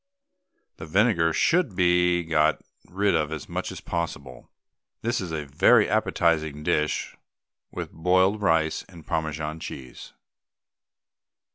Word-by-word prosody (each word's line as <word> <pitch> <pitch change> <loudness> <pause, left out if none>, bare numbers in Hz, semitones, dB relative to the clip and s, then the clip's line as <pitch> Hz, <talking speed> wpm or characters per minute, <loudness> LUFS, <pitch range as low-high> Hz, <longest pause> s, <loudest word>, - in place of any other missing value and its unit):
The 80 - -9
vinegar 90 -2 +2
should 160 - +1
be 90 -1 +3
got 80 -1 +2 0.3
rid 100 +2 +1
of 75 -1 0
as 80 -3 -6
much - - -4
as - - -8
possible. 75 -6 -5 0.5
This 120 0 0
is 90 -3 -5
a 75 -2 -3
very 70 +1 +4
appetising 80 -3 0
dish 75 0 -1 0.5
with - - -6
boiled 95 +5 +2
rice 80 -5 +1
and 85 -4 -14
Parmesan 80 0 -3
cheese. 65 -5 -9
80 Hz, 120 wpm, -25 LUFS, 75-90 Hz, 0.5 s, very